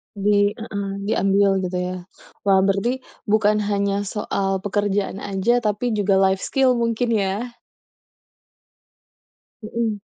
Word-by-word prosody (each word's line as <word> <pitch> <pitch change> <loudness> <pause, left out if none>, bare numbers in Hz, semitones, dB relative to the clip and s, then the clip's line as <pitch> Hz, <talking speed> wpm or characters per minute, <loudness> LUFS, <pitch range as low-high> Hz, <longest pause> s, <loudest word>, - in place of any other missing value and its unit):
Di 205 0 +2
heeh, 200 -3 -5
diambil 195 -1 +2
gitu 185 -1 -3
ya. 180 0 -2 0.5
Wah, 190 -1 +5
berarti 200 +7 0 0.2
bukan 210 0 +3
hanya 200 0 0
soal 195 -2 -2
pekerjaan 205 -1 -1
aja 205 +5 +1
tapi 220 +2 -1
juga 205 -2 +1
life 190 0 +3
skill 255 +3 +1
mungkin 235 +1 0
ya? 205 +5 -3 2.0
Hmm. 220 0 -2
205 Hz, 115 wpm, -22 LUFS, 195-220 Hz, 2.0 s, Wah